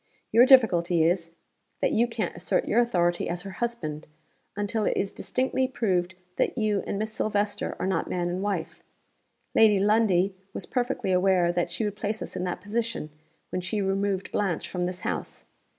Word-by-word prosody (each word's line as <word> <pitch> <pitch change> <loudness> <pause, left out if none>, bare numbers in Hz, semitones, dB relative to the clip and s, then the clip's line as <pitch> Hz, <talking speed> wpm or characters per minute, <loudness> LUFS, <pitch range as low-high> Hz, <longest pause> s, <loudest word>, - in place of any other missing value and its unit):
Your 235 +4 +7
difficulty 180 -10 +5
is, 170 0 0 0.4
that - - +1
you 235 +2 +3
can't 230 -2 -3
assert 175 - 0
your 230 - +3
authority 175 -7 +1
as 175 +1 -3
her 195 - -7
husband, 165 -11 -3 0.5
until 205 +2 -1
it - - 0
is 195 - 0
distinctly 260 0 -1
proved 185 -8 -1 0.2
that - - 0
you 215 -3 +1
and - - -2
Miss 215 +1 -3
Silvester 205 -1 -1
are - - -2
not 190 -3 -1
man 175 -1 -1
and 180 +2 -2
wife. 175 -5 -3 0.7
Lady 210 -3 +5
Lundie 200 -2 +3 0.2
was - - -5
perfectly 245 -6 -1
aware 180 -1 +3
that 175 0 -1
she 175 +6 -2
would 205 -1 -3
place 215 +1 -2
us - - -8
in 180 - -2
that 180 0 -3
position, 220 -5 -3 0.4
when 185 - -2
she 210 +4 -2
removed 195 0 -1
Blanche 200 -5 -1
from 180 -1 -2
this 180 0 -4
house. - - -4
195 Hz, 180 wpm, -27 LUFS, 175-220 Hz, 0.7 s, Your